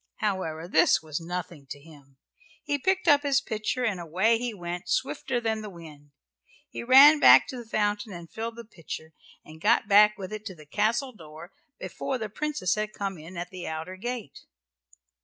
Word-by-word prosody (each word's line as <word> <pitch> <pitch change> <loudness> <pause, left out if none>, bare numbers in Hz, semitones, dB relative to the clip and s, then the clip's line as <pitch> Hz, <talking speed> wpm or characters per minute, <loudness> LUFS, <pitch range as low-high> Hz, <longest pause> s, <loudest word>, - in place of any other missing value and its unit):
However, 175 -6 -3
this 160 -2 +3
was 155 -1 -4
nothing 170 -4 -6
to 145 - -7
him. 140 -3 -18 0.5
He 285 0 -1
picked 380 +4 0
up 290 -2 +6
his 280 -2 +2
pitcher 235 0 -3
and 205 -6 -1
away 190 +8 +1
he 245 0 -3
went, 175 -2 -7
swifter 240 - -1
than 220 -2 -2
the 210 - -7
wind. 155 -5 -13 0.6
He - - -6
ran 275 +5 +8
back 125 - +7
to 260 - -6
the 235 -2 -10
fountain 210 0 -1
and 170 -2 -9
filled 225 +5 -6
the 235 0 -10
pitcher, 160 -5 -9 0.3
and 155 +1 -14
got 230 +1 +3
back 210 0 +6
with 195 +1 -7
it 215 0 -6
to 190 -4 -7
the 155 -2 -15
castle 220 - -1
door 160 -1 -12 0.3
before 265 - -4
the 220 -3 -5
Princess 295 - -2
had 215 0 -3
come 195 -4 -4
in 170 +4 -11
at 175 +1 -6
the 185 -2 -7
outer 160 +4 -5
gate. 235 - -6
200 Hz, 190 wpm, -27 LUFS, 165-230 Hz, 0.6 s, ran